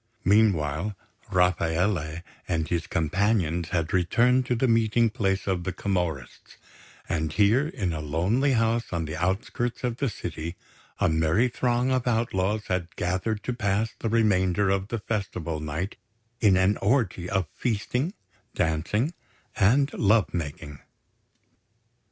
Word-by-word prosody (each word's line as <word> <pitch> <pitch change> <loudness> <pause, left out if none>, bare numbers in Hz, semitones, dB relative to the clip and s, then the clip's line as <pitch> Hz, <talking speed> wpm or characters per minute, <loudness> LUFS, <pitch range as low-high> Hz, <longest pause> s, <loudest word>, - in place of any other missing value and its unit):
Meanwhile, 100 -3 +2 0.4
Rafaele 90 -2 +1 0.2
and 80 -1 -1
his 85 -2 -2
companions 85 0 0
had 85 -4 -1
returned 120 +8 +3
to 125 - +1
the 130 +3 +1
meeting 115 0 +3
place 95 -2 0
of 95 -3 -1
the 95 - -2
Camorrists; 90 -10 -3 0.5
and 80 -2 -1
here, 110 - +3
in 100 - -2
a 80 - -3
lonely 95 - +1
house 115 0 +1
on 85 -2 -1
the 80 +1 -5
outskirts 95 +8 -2
of 120 -1 -1
the 140 - 0
city, 85 -4 -6 0.4
a - - +2
merry 80 +9 +2
throng 125 +1 0
of 130 -1 0
outlaws 110 -3 0
had 90 -2 -3
gathered 95 +5 -1
to 125 - -2
pass 110 -1 0
the 115 - -2
remainder 100 -3 +2
of 95 0 0
the 115 - -3
Festival 95 -7 -3
night 75 +6 -4 0.4
in 100 -5 +4
an 95 +2 +3
orgy 100 -6 0
of 95 -2 0
feasting, 125 - -1 0.4
dancing 85 - 0 0.4
and 135 +8 +3
love 105 0 +2
making. 75 -3 -5
95 Hz, 135 wpm, -26 LUFS, 85-115 Hz, 0.5 s, in